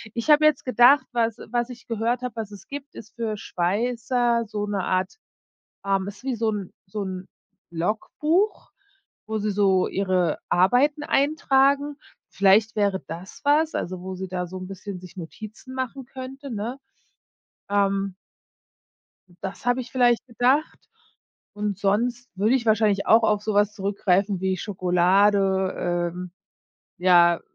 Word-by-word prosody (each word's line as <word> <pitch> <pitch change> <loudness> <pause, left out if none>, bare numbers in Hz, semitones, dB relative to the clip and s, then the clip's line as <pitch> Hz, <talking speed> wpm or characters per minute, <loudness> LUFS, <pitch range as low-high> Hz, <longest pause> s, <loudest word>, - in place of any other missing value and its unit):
Ich 235 +5 -3
hab 295 - +6
jetzt 305 -2 +3
gedacht, 255 +3 +5
was 230 -2 0
was 240 0 0
ich 245 -2 -11
gehört 230 +2 -1
hab, 250 -2 -4
was 220 -3 -5
es 195 -2 -12
gibt, 285 0 -8
ist 220 - -12
für 220 -3 -3
Schweißer 235 +6 0
so 210 0 -3
'ne 205 -2 -2
Art, 185 - -1 0.7
ähm 195 -1 +1
ist 205 +4 -9
wie 265 -2 -1
so 225 -1 0
'n 200 -4 -5
so 205 +2 -5
'n 185 -1 -6 0.4
Logbuch, 300 - -1 0.6
wo 220 0 -2
sie 210 0 -1
so 195 -2 +3
ihre 185 -4 0
Arbeiten 255 +11 +3
eintragen. 280 0 +2 0.3
Vielleicht 200 +3 +3
wäre 200 -2 +1
das 170 +4 -9
was, 305 +2 +3
also 180 0 -3
wo 190 +1 -6
sie 190 +1 -5
da 180 -1 -3
so 185 +2 -8
'n 185 - -7
bisschen 195 0 -7
sich 185 +1 -13
Notizen 215 +8 -9
machen 260 0 -4
könnte, 265 +1 -8
ne? 230 +5 -4 0.9
Ähm, 195 -1 +1 1.3
das 190 +5 -7
hab 245 +1 +2
ich 245 -2 -5
vielleicht 245 -1 +2
gedacht. 255 +5 +1 0.8
Und 205 -2 -3
sonst 235 +5 0
würde 215 +6 +2
ich 245 -3 0
wahrscheinlich 215 -2 +2
auch 225 +1 +6
auf 210 -1 +2
so 215 0 -2
was 205 0 +3
zurückgreifen 195 -1 0
wie 190 0 0
Schokolade, 190 -1 +2
ähm, 180 0 -7 0.7
ja, 175 -1 +5
210 Hz, 150 wpm, -24 LUFS, 190-245 Hz, 1.3 s, hab